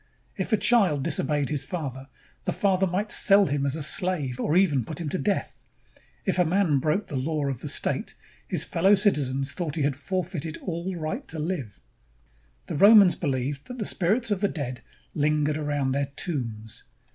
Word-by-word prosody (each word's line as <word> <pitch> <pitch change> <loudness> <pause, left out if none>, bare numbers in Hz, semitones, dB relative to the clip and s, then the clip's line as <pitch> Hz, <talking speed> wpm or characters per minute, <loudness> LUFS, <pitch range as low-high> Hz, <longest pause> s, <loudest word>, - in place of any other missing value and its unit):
If - - -4
a 220 - +4
child 190 - +3
disobeyed 145 -2 0
his 145 -3 0
father, 135 -3 -5 0.4
the - - 0
father 190 -1 +1
might 200 +4 -2
sell 200 0 +6
him 140 -2 -1
as 140 - -1
a 160 - -2
slave 150 -6 +2
or 155 - +1
even 150 -10 +3
put 160 +9 -7
him 165 -4 -3
to 185 - -2
death. 205 -2 -2 0.6
If 190 -2 0
a - - +6
man 170 -4 +2
broke 155 +9 0
the 145 - -7
law 150 +3 -1
of 135 -4 -5
the - - -5
state, - - -2 0.3
his - - +2
fellow 190 +5 +3
citizens 140 -9 0
thought 165 -5 -4
he 155 - -1
had 140 -1 0
forfeited 165 0 -4
all 180 +1 -4
right 155 -2 -4
to 160 - -5
live. 145 - -4 0.8
The - - -4
Romans 200 -2 +7
believed 140 -1 -3
that 250 - -8
the 215 - -3
spirits 210 +7 +1
of 200 -2 0
the 200 - +3
dead 130 -8 -5 0.3
lingered 150 0 +1
around 145 -3 -1
their 140 +1 0
tombs. 115 - -4
155 Hz, 185 wpm, -26 LUFS, 140-185 Hz, 0.8 s, Romans